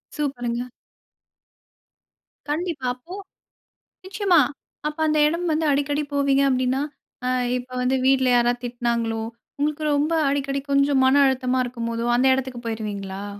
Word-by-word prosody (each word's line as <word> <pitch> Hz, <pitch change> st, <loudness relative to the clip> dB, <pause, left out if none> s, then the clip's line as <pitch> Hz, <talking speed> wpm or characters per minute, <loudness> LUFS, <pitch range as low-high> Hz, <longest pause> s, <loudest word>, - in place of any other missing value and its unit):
சூப்பர்ங்க. 245 Hz, -4 st, -2 dB, 1.8 s
கண்டிப்பா. 310 Hz, -3 st, -2 dB
அப்போ 340 Hz, +9 st, -11 dB, 0.9 s
நிச்சயமா. 380 Hz, -3 st, +3 dB, 0.5 s
அப்ப 305 Hz, +1 st, -8 dB
அந்த 305 Hz, 0 st, +2 dB
இடம் 340 Hz, +2 st, -2 dB
வந்து 315 Hz, +1 st, 0 dB
அடிக்கடி 290 Hz, +1 st, 0 dB
போவீங்க 280 Hz, -1 st, +2 dB
அப்டின்னா, 260 Hz, +1 st, +1 dB, 0.4 s
அ -, -, +1 dB, 0.3 s
இப்போ 250 Hz, +1 st, -10 dB
வந்து 260 Hz, +1 st, +2 dB
வீட்ல 265 Hz, -1 st, +4 dB
யாராவது 240 Hz, +1 st, +1 dB
திட்டினாங்களோ 235 Hz, -2 st, -1 dB, 0.4 s
உங்களுக்கு 300 Hz, +1 st, -1 dB
ரொம்ப 300 Hz, +3 st, +1 dB, 0.2 s
அடிக்கடி 275 Hz, 0 st, -1 dB
கொஞ்சம் 280 Hz, -1 st, +3 dB
மன 265 Hz, +2 st, +4 dB
அழுத்தமா 260 Hz, -1 st, +1 dB
இருக்கும்போதோ 230 Hz, -1 st, -3 dB
அந்த 260 Hz, +2 st, +3 dB
இடத்துக்கு 260 Hz, -2 st, -4 dB
போயிருவீங்களா? 200 Hz, -3 st, -4 dB
265 Hz, 120 wpm, -23 LUFS, 240-290 Hz, 1.8 s, வீட்ல